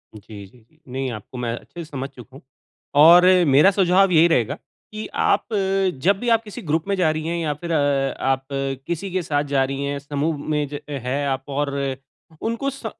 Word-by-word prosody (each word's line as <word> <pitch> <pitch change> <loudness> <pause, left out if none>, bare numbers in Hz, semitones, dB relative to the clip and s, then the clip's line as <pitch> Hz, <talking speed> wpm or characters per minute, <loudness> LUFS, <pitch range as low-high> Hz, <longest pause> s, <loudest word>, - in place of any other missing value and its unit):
जी, 105 -1 -11
जी। 120 +8 -25
नहीं 130 +1 -3
आपको 110 +3 -9
मैं 120 -1 -2
अच्छे 170 +6 -10
से 155 - -14
समझ 135 -1 -5
चुका 130 -1 -15
हूँ 135 - -12 0.6
और 175 +3 +8 0.2
मेरा 145 +8 +6
सुझाव 190 0 +3
यही 165 0 +6
रहेगा 140 -4 +1 0.4
कि 215 0 -6
आप 230 - +1
अ, 195 -1 +1
जब 195 +7 +2
भी 245 - -2
आप 230 -1 +3
किसी 210 - -9
ग्रुप 160 -1 -1
में 200 - +1
जा 180 -4 +2
रही 155 0 -4
हैं 170 +1 -1
या 160 -3 -1
फ़िर 170 +4 -7
अ, 140 -3 +1
आप 135 0 0 0.4
किसी 175 +3 -3
के 185 +1 0
साथ 145 -2 0
जा 140 -2 +1
रही 135 +1 -3
हैं 140 0 -2
समूह 145 +2 -2
में 150 -1 0
ज 145 - -4
है 140 0 -2
आप 135 -1 -2
और 140 +1 -1 0.7
उनको 230 +5 -2
स 275 -3 -10
150 Hz, 210 wpm, -22 LUFS, 135-180 Hz, 0.7 s, और